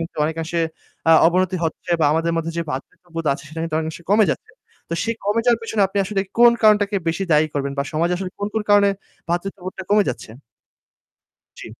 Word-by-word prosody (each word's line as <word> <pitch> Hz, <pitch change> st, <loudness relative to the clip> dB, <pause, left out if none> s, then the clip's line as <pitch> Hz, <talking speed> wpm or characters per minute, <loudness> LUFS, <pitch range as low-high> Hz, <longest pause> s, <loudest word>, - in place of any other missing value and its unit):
কিন্তু 165 Hz, -, -6 dB
অনেকাংশে 165 Hz, +2 st, -2 dB, 0.5 s
আ -, -, +8 dB
অবনতি 185 Hz, +2 st, +1 dB
হচ্ছে 165 Hz, +2 st, -4 dB
বা 150 Hz, -, +4 dB
আমাদের 165 Hz, +1 st, 0 dB
মধ্যে, 165 Hz, 0 st, -2 dB
যে -, -, +1 dB
ভ্রাতৃত্ববোধ 165 Hz, +4 st, -6 dB
আছে 140 Hz, +2 st, -7 dB
সেটা 160 Hz, +2 st, -7 dB
কিন্তু 165 Hz, -1 st, -3 dB
অনেকাংশে 160 Hz, +2 st, -6 dB
কমে 215 Hz, 0 st, +5 dB
যাচ্ছে। 440 Hz, -, -11 dB, 0.4 s
তো 170 Hz, -, -2 dB
সেই 230 Hz, 0 st, -1 dB
কমে 210 Hz, +3 st, +1 dB
যাওয়ার 235 Hz, -2 st, +3 dB
পিছনে 220 Hz, -2 st, 0 dB
আপনি 195 Hz, +1 st, -3 dB
আসলে 195 Hz, +1 st, -1 dB, 0.2 s
কোন 240 Hz, 0 st, +8 dB
কারণটাকে 210 Hz, -1 st, +4 dB
বেশি 175 Hz, +4 st, -1 dB
দায়ী 150 Hz, +1 st, +4 dB
করবেন 140 Hz, -1 st, -2 dB
বা -, -, +2 dB
সমাজে 170 Hz, +3 st, +1 dB
আসলে 185 Hz, 0 st, -5 dB
কোন, 205 Hz, -, -2 dB
কোন 220 Hz, -, 0 dB
কারণে 205 Hz, -1 st, +6 dB, 0.4 s
ভ্রাতৃত্ববোধটা 185 Hz, +2 st, -4 dB
কমে 205 Hz, 0 st, +5 dB
যাচ্ছে? 110 Hz, -, -5 dB, 1.3 s
জি। -, -, -8 dB
180 Hz, 195 wpm, -21 LUFS, 160-205 Hz, 1.3 s, আ